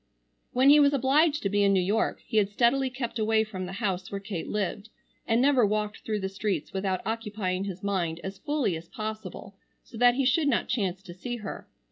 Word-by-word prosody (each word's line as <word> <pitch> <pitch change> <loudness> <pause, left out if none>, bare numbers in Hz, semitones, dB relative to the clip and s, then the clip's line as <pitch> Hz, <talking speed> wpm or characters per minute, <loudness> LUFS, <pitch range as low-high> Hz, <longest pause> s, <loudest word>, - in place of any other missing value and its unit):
When 260 +3 +5
he 300 - +8
was 285 -1 +5
obliged 285 +3 +3
to 200 - +1
be 205 +1 +1
in 200 -1 +4
New 190 - +4
York 210 +5 0
he 220 - -2
had 200 -2 +3
steadily 250 +5 +2
kept 245 -2 -4
away 220 0 +3
from 190 -4 -6
the 185 - -7
house 190 -3 -2
where 200 - -3
Kate 195 -4 -5
lived, 210 +1 -3 0.4
and 225 +1 +3
never 265 -1 +4
walked 210 0 0
through 215 -2 -3
the 190 - -1
streets 195 -4 -3
without 190 -1 -1
occupying 210 -4 -2
his 190 -1 -6
mind 175 -5 -1
as 195 0 -6
fully 280 - 0
as 165 +1 -9
possible 215 -2 -6 0.3
so 225 - -11
that 245 0 +6
he 270 0 +1
should 290 +4 +3
not 265 - +1
chance 195 -6 -1
to 180 -3 -10
see 240 +7 -5
her. 215 -3 -7
210 Hz, 215 wpm, -27 LUFS, 195-245 Hz, 0.4 s, he